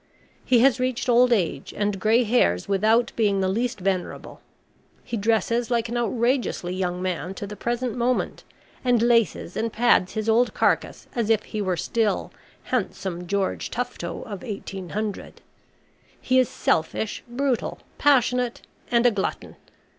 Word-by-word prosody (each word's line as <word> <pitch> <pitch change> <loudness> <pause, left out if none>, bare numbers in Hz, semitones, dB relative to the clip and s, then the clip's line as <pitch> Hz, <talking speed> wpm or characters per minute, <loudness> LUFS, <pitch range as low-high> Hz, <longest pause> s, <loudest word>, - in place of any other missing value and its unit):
He 245 -3 +4
has 265 0 +4
reached 255 -1 -1
old 245 +1 +5
age 175 - 0
and 205 -1 -1
grey 225 +4 +4
hairs 205 - +2
without 220 +4 +2
being 205 -3 +2
the 190 - +1
least 235 +5 -1
venerable. 185 -1 -3 0.6
He - - -4
dresses 230 +2 +1
like 235 -2 0
an 240 - -3
outrageously 240 -5 0
young 180 -1 -2
man 185 0 -3
to 205 - -5
the 210 +1 -7
present 240 +2 -2
moment, 245 +1 -1 0.4
and 245 -2 +3
laces 230 -7 +2
and 225 0 -1
pads 225 -5 +3
his 215 0 -3
old 235 +2 +3
carcass - - 0
as 235 -4 -1
if 220 -2 +3
he 215 - -4
were 185 -3 0
still 220 +5 0 0.3
handsome 190 -7 -3
George 200 0 -1
Tufto 240 -8 -4
of 200 -4 -7
1800. 205 -1 -5 0.8
He 260 0 +2
is 255 - +2
selfish, 160 +6 -1
brutal, 250 0 -1 0.2
passionate, 250 -3 +2 0.3
and 235 0 +3
a 245 - +6
glutton. 200 -3 -3
225 Hz, 145 wpm, -24 LUFS, 195-245 Hz, 0.8 s, a